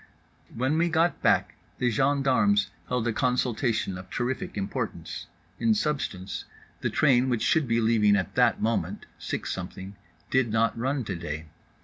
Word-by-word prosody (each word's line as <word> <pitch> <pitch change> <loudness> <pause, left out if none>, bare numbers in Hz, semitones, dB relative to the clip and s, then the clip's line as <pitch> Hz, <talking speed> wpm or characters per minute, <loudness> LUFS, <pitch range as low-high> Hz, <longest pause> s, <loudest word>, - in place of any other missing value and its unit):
When 130 +7 0
we 170 +1 +3
got 165 +1 +2
back - - +3 0.2
the 125 -1 +1
gendarmes 140 - +2 0.2
held 125 -2 -1
a 115 - +1
consultation 120 -5 0
of 90 - -11
terrific 125 -2 -3
importance; 95 -1 -4 0.3
in 225 -1 +3
substance, 135 - -2 0.3
the - - -1
train 130 -3 +3
which 120 -3 0
should 155 -4 +2
be 115 0 +2
leaving 110 -2 +4
at 95 -4 -1
that 125 -2 +3
moment 115 +1 -1
(six - - -3
something) 95 +2 -7 0.4
did 130 -3 +3
not 115 +1 +2
run 130 +3 -1
to 100 -4 -4
day. 80 -2 -5
120 Hz, 150 wpm, -27 LUFS, 105-135 Hz, 0.4 s, leaving